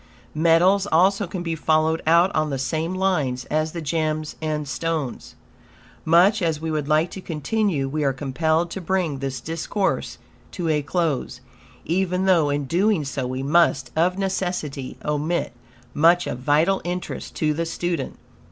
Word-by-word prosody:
Metals 175 Hz, +5 st, +4 dB
also 190 Hz, +4 st, +3 dB
can 175 Hz, 0 st, -5 dB
be 165 Hz, -1 st, -2 dB
followed 160 Hz, 0 st, +1 dB
out 170 Hz, +4 st, +5 dB
on 155 Hz, -1 st, +1 dB
the 135 Hz, -, -2 dB
same 160 Hz, +6 st, -2 dB
lines 150 Hz, -10 st, 0 dB
as 155 Hz, +1 st, 0 dB
the 170 Hz, -1 st, -6 dB
gems 155 Hz, 0 st, -2 dB
and 155 Hz, -2 st, -2 dB
stones. 155 Hz, -1 st, -3 dB, 0.7 s
Much 180 Hz, +6 st, +5 dB
as 160 Hz, -3 st, 0 dB
we 160 Hz, 0 st, -3 dB
would 150 Hz, -2 st, -2 dB
like 155 Hz, +3 st, +2 dB
to 190 Hz, -, -7 dB
continue, 165 Hz, -2 st, -1 dB
we 150 Hz, +2 st, -2 dB
are 140 Hz, -, +2 dB
compelled 160 Hz, +5 st, 0 dB
to 195 Hz, -, -5 dB
bring 175 Hz, -5 st, -1 dB
this 135 Hz, -1 st, -3 dB
discourse 165 Hz, +5 st, -2 dB, 0.4 s
to 170 Hz, -3 st, -2 dB
a 150 Hz, -1 st, +2 dB
close, 155 Hz, -2 st, -2 dB, 0.5 s
even 185 Hz, +2 st, 0 dB
though 170 Hz, -6 st, +4 dB
in 145 Hz, 0 st, -1 dB
doing 180 Hz, +2 st, +1 dB
so 135 Hz, -2 st, -3 dB
we 130 Hz, +1 st, -4 dB
must 140 Hz, -3 st, +2 dB
of 180 Hz, +3 st, +2 dB
necessity 180 Hz, -8 st, -3 dB
omit 150 Hz, 0 st, -1 dB, 0.4 s
much 170 Hz, +3 st, +4 dB
of 125 Hz, -, -4 dB
vital 155 Hz, +8 st, +2 dB
interest 180 Hz, +1 st, -5 dB
to 155 Hz, -1 st, +1 dB
the 165 Hz, +2 st, -2 dB
student. 170 Hz, -3 st, -3 dB
160 Hz, 160 wpm, -23 LUFS, 150-180 Hz, 0.7 s, out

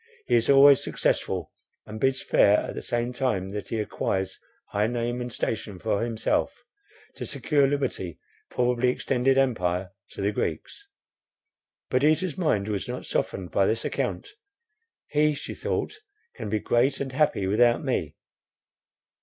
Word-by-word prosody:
He -, -, -1 dB
is 115 Hz, -1 st, +3 dB
always 140 Hz, 0 st, +7 dB
successful, -, -, -1 dB, 0.3 s
and 110 Hz, +1 st, -8 dB
bids 130 Hz, +1 st, +1 dB
fair, 100 Hz, +1 st, +5 dB
at -, -, -5 dB
the -, -, -5 dB
same 120 Hz, +1 st, -2 dB
time 120 Hz, -8 st, -1 dB
that 105 Hz, 0 st, -5 dB
he 115 Hz, -, -2 dB
acquires 95 Hz, -2 st, -2 dB, 0.3 s
high 105 Hz, +1 st, +1 dB
name 120 Hz, +1 st, -2 dB
and 120 Hz, 0 st, -5 dB
station 110 Hz, -3 st, -3 dB
for 100 Hz, +1 st, -1 dB
himself, 115 Hz, -, -1 dB, 0.5 s
to -, -, -5 dB
secure 145 Hz, -3 st, +2 dB
liberty, 135 Hz, -, -2 dB, 0.3 s
probably 125 Hz, 0 st, +1 dB
extended 130 Hz, +1 st, +1 dB
empire, 95 Hz, -8 st, +1 dB, 0.2 s
to -, -, -6 dB
the 100 Hz, -, +2 dB
Greeks." 400 Hz, -, -4 dB, 1.0 s
Perdita's 155 Hz, +6 st, +2 dB
mind 130 Hz, -, 0 dB
was 105 Hz, -2 st, -2 dB
not -, -, -5 dB
softened 95 Hz, -2 st, -2 dB
by 100 Hz, -1 st, +3 dB
this 115 Hz, +1 st, -1 dB
account. -, -, -2 dB, 0.8 s
He, 150 Hz, 0 st, +2 dB
she -, -, -6 dB
thought, 430 Hz, -, -3 dB, 0.3 s
can -, -, -6 dB
be 110 Hz, -, +1 dB
great 125 Hz, +6 st, +1 dB
and 135 Hz, -1 st, -3 dB
happy 130 Hz, -8 st, +1 dB
without 120 Hz, +6 st, +3 dB
me. 90 Hz, -, -2 dB
120 Hz, 145 wpm, -26 LUFS, 105-135 Hz, 1.0 s, always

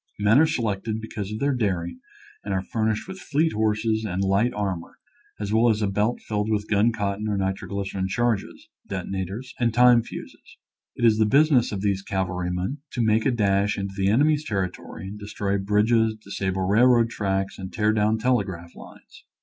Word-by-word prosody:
Men 105 Hz, +5 st, +4 dB
are 160 Hz, -, +5 dB
selected 110 Hz, -6 st, -2 dB
because 105 Hz, -2 st, -6 dB
of 105 Hz, -, -3 dB
their 140 Hz, +4 st, +1 dB
daring 90 Hz, -8 st, -2 dB, 0.4 s
and 100 Hz, -1 st, -2 dB
are 95 Hz, -, -1 dB
furnished 110 Hz, -, -1 dB
with 190 Hz, 0 st, -8 dB
fleet 160 Hz, -1 st, 0 dB
horses 110 Hz, +1 st, 0 dB
and 95 Hz, -2 st, -2 dB
light 100 Hz, +5 st, +2 dB
armor, 95 Hz, -5 st, -4 dB, 0.4 s
as 105 Hz, 0 st, -3 dB
well 115 Hz, +2 st, +4 dB
as 110 Hz, -1 st, +1 dB
a -, -, +2 dB
belt 105 Hz, +4 st, 0 dB
filled 105 Hz, 0 st, -2 dB
with 105 Hz, -1 st, -1 dB
gun 105 Hz, +2 st, +3 dB
cotton 105 Hz, -1 st, -2 dB
or 105 Hz, -1 st, -1 dB
nitroglycerin 95 Hz, 0 st, -2 dB
charges, 115 Hz, 0 st, -1 dB, 0.2 s
detonators, 95 Hz, +6 st, -5 dB
and 120 Hz, -1 st, +2 dB
time 125 Hz, -1 st, +6 dB
fuses. -, -, -11 dB, 0.4 s
It 120 Hz, -, 0 dB
is 110 Hz, -1 st, +4 dB
the 110 Hz, -, +4 dB
business 140 Hz, 0 st, +4 dB
of 100 Hz, -2 st, -3 dB
these 100 Hz, -1 st, 0 dB
cavalrymen 90 Hz, +5 st, -2 dB
to 120 Hz, -, 0 dB
make 110 Hz, +1 st, +2 dB
a -, -, +3 dB
dash 100 Hz, -3 st, +1 dB
into 100 Hz, -1 st, -4 dB
the 95 Hz, -1 st, +1 dB
enemy's 150 Hz, +7 st, +3 dB
territory 95 Hz, -, -4 dB
and 105 Hz, +2 st, -8 dB
destroy 100 Hz, -1 st, -2 dB
bridges, 110 Hz, +3 st, +2 dB
disable 95 Hz, -3 st, -3 dB
railroad 115 Hz, +4 st, +4 dB
tracks 95 Hz, -2 st, -2 dB
and 95 Hz, -1 st, -6 dB
tear 110 Hz, 0 st, +1 dB
down 110 Hz, +1 st, +2 dB
telegraph 100 Hz, -8 st, -1 dB
lines. -, -, -15 dB
105 Hz, 180 wpm, -24 LUFS, 95-115 Hz, 0.4 s, time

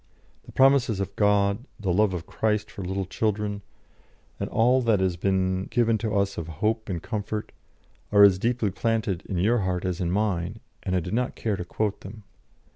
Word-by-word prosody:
The -, -, -10 dB
promises 130 Hz, -6 st, +4 dB
of 100 Hz, 0 st, -4 dB
God, 105 Hz, +1 st, +2 dB, 0.2 s
the 95 Hz, -4 st, 0 dB
love 100 Hz, 0 st, +2 dB
of 85 Hz, -1 st, -5 dB
Christ 105 Hz, -1 st, -1 dB
for 100 Hz, -, -7 dB
little 95 Hz, +1 st, -2 dB
children, 105 Hz, +1 st, -2 dB, 0.8 s
and -, -, -3 dB
all 125 Hz, +3 st, +3 dB
that 115 Hz, -4 st, +2 dB
has 95 Hz, -2 st, +1 dB
been 95 Hz, +1 st, 0 dB
given 115 Hz, -3 st, +1 dB
to 110 Hz, -1 st, -2 dB
us 100 Hz, 0 st, 0 dB
of 80 Hz, -, -5 dB
hope 110 Hz, +3 st, -1 dB
and 85 Hz, -3 st, -3 dB
comfort, 105 Hz, -1 st, -4 dB, 0.6 s
are 100 Hz, 0 st, +7 dB
as 95 Hz, -2 st, +6 dB
deeply 115 Hz, -2 st, 0 dB
planted 105 Hz, -3 st, -1 dB
in 95 Hz, -, -3 dB
your 110 Hz, +7 st, +2 dB
heart 95 Hz, -2 st, -1 dB
as 90 Hz, -1 st, -2 dB
in 85 Hz, -, 0 dB
mine, 100 Hz, 0 st, -1 dB, 0.2 s
and 95 Hz, -2 st, -2 dB
I 90 Hz, -, +2 dB
did 90 Hz, +4 st, -5 dB
not 125 Hz, +2 st, -1 dB
care 110 Hz, -3 st, -1 dB
to 90 Hz, -, -4 dB
quote 105 Hz, +3 st, -2 dB
them. 105 Hz, +2 st, -10 dB
100 Hz, 195 wpm, -26 LUFS, 95-110 Hz, 0.8 s, are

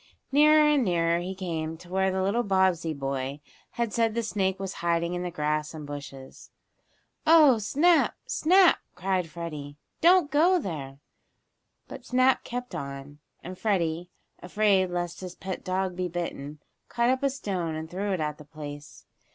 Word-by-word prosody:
Nearer 300 Hz, +2 st, +6 dB
and 295 Hz, -3 st, +3 dB
nearer 170 Hz, -3 st, +1 dB
he 185 Hz, +2 st, -5 dB
came 165 Hz, -4 st, -4 dB
to 175 Hz, -, -15 dB
where 190 Hz, +1 st, +1 dB
the 190 Hz, 0 st, -1 dB
little 200 Hz, +5 st, +1 dB
Bobbsey 190 Hz, -6 st, +1 dB
boy 135 Hz, -1 st, -3 dB, 0.3 s
had 235 Hz, -3 st, -2 dB
said 230 Hz, -2 st, +1 dB
the 235 Hz, -, 0 dB
snake 190 Hz, -3 st, -1 dB
was 195 Hz, -1 st, -4 dB
hiding 170 Hz, 0 st, 0 dB
in 175 Hz, -, -3 dB
the 180 Hz, -, -3 dB
grass 150 Hz, -1 st, -2 dB
and 150 Hz, -1 st, -7 dB
bushes. 140 Hz, -2 st, -9 dB, 0.8 s
"Oh, 305 Hz, -7 st, +7 dB
Snap! 315 Hz, -, +3 dB
Snap!" 365 Hz, +2 st, +4 dB, 0.2 s
cried 180 Hz, -1 st, -1 dB
Freddie. 150 Hz, -3 st, -7 dB, 0.2 s
"Don't 345 Hz, -3 st, +5 dB
go 340 Hz, +5 st, +4 dB
there!" 150 Hz, -, -5 dB, 0.9 s
But -, -, -9 dB
Snap 255 Hz, +1 st, +3 dB
kept 245 Hz, -2 st, -6 dB
on, 140 Hz, -2 st, -7 dB, 0.2 s
and 185 Hz, +1 st, -8 dB
Freddie, 175 Hz, -5 st, -1 dB, 0.3 s
afraid 195 Hz, 0 st, +2 dB
lest 175 Hz, 0 st, -4 dB
his 185 Hz, -1 st, -7 dB
pet 190 Hz, -1 st, -6 dB
dog 185 Hz, 0 st, -2 dB
be 180 Hz, 0 st, -2 dB
bitten, 155 Hz, -4 st, -5 dB, 0.3 s
caught 235 Hz, +1 st, +2 dB
up 260 Hz, -, 0 dB
a 280 Hz, -, +2 dB
stone 185 Hz, -11 st, -3 dB
and 160 Hz, 0 st, -5 dB
threw 195 Hz, +4 st, -3 dB
it 185 Hz, -, -1 dB
at 150 Hz, -1 st, -3 dB
the -, -, -10 dB
place. 145 Hz, -1 st, -10 dB
180 Hz, 165 wpm, -27 LUFS, 160-225 Hz, 0.9 s, Oh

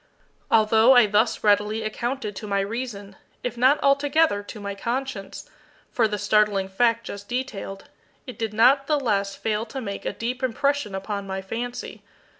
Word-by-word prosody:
Although 220 Hz, +3 st, +5 dB
I 245 Hz, -2 st, +7 dB
thus 215 Hz, +2 st, +1 dB
readily 210 Hz, +1 st, +2 dB
accounted 220 Hz, 0 st, -3 dB
to 215 Hz, -, -6 dB
my 200 Hz, -1 st, +1 dB
reason, 205 Hz, -2 st, -5 dB, 0.3 s
if 245 Hz, -, -3 dB
not 260 Hz, +5 st, +4 dB
altogether 280 Hz, -3 st, +3 dB
to 210 Hz, +2 st, -10 dB
my 200 Hz, -1 st, -4 dB
conscience, 230 Hz, -2 st, -4 dB, 0.4 s
for 230 Hz, -2 st, +2 dB
the 210 Hz, -1 st, -3 dB
startling 205 Hz, -1 st, +2 dB
fact 230 Hz, +3 st, +2 dB
just 200 Hz, 0 st, -8 dB
detailed, 235 Hz, -6 st, -4 dB, 0.4 s
it 255 Hz, -1 st, -10 dB
did 225 Hz, -2 st, -2 dB
not 260 Hz, +6 st, +4 dB
the 300 Hz, -2 st, +2 dB
less 200 Hz, -6 st, 0 dB
fail 215 Hz, 0 st, -1 dB
to 265 Hz, -, -6 dB
make 200 Hz, -5 st, -5 dB
a -, -, -2 dB
deep 245 Hz, +3 st, -4 dB
impression 260 Hz, -3 st, 0 dB
upon 200 Hz, +1 st, -4 dB
my 190 Hz, 0 st, -3 dB
fancy. 235 Hz, +6 st, -6 dB
220 Hz, 165 wpm, -24 LUFS, 200-250 Hz, 0.4 s, I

